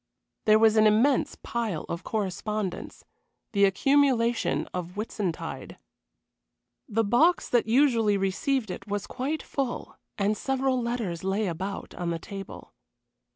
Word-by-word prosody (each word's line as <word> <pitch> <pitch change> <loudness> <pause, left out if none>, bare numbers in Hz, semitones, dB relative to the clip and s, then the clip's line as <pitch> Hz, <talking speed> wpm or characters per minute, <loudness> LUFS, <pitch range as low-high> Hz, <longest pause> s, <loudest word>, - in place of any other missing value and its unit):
There 215 0 +6
was 220 0 +4
an 215 0 +6
immense 235 +6 +3
pile 225 -9 -2
of 170 +1 -5
correspondence 210 -1 -3 0.5
the 200 -2 +4
accumulation 240 +2 +2
of 180 +1 -5
Whitsuntide. 205 -5 -4 1.1
The 225 +2 +1
box 300 - +3
that 240 -2 +2
usually 230 -4 +3
received 205 +4 0
it 195 +2 -8
was 205 -1 -2
quite 290 +5 -3
full, 270 -3 -4 0.2
and 205 +1 +1
several 265 +1 0
letters 230 -8 -3
lay 195 +3 0
about 190 +3 -4
on 175 -2 -3
the 170 - -1
table. 195 +3 -9
215 Hz, 125 wpm, -27 LUFS, 195-245 Hz, 1.1 s, There